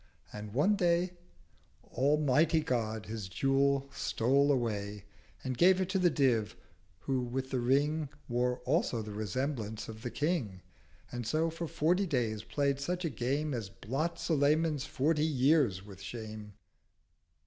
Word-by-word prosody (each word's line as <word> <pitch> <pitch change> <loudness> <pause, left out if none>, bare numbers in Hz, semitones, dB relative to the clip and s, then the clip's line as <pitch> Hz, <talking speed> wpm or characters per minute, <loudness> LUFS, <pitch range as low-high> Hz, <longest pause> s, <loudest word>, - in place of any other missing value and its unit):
And 105 0 -7
one 190 +10 +4
Day 175 -1 +2 0.8
Almighty 150 +3 +3
God 110 -6 -2
his 105 -1 -5
Jewel 135 +5 +2
stole 140 +6 +2
away, 105 -5 -2 0.4
And 130 -1 -2
gave 185 +7 +5
it 185 -1 -1
to 190 0 +1
the 180 -1 +4
Div, 125 -8 +1 0.5
who 135 -2 0
with 130 +2 -3
the 130 - 0
Ring 145 +4 +1 0.2
Wore 125 0 0
also 130 - +1
the 105 - -7
Resemblance 110 0 -3
of 110 0 -9
the 120 - -3
King, 130 - -2 0.5
And 120 -2 -4
so 160 +6 +1
for 165 +1 -4
forty 180 +6 +1
days 115 -8 -1
play'd 140 +3 0
such 175 +5 -2
a 160 - -1
Game 135 +5 -1
As 115 -5 -4
blots 135 +12 -3
Sulayman's 150 -1 +2
forty 150 +3 +1
years 135 - +2
with 100 -2 -12
Shame. 110 -1 -7
135 Hz, 145 wpm, -32 LUFS, 110-155 Hz, 0.8 s, gave